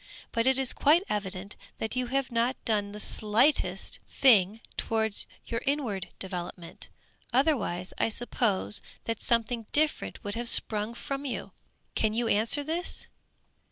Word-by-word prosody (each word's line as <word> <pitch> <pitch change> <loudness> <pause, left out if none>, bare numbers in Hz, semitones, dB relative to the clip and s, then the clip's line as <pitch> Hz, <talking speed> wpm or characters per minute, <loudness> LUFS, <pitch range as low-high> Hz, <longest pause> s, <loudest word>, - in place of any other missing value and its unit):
But 230 +2 +1
it 265 0 +4
is 265 -2 +2
quite 320 +6 +4
evident, 200 -1 -3 0.2
that 220 +3 -3
you 255 -1 0
have 270 +1 -1
not 240 +2 +1
done 205 -3 +1
the 210 - -8
slightest 220 +8 +2
thing 215 -5 +5 0.2
towards 220 -2 0 0.2
your 230 0 -3
inward 240 -10 -1
developement; 175 -2 -6 0.4
otherwise 240 - +1
I - - +3
suppose 220 -3 0 0.2
that 230 -1 -2
something 230 -1 +1
different 305 -3 0
would 205 -1 -4
have 235 +1 -1
sprung 215 +1 +2
from 275 +3 -4
you. 275 - -4 0.4
Can 220 -1 +1
you 235 0 +1
answer 225 +8 +2
this? 330 +4 -3
230 Hz, 140 wpm, -29 LUFS, 210-265 Hz, 0.4 s, thing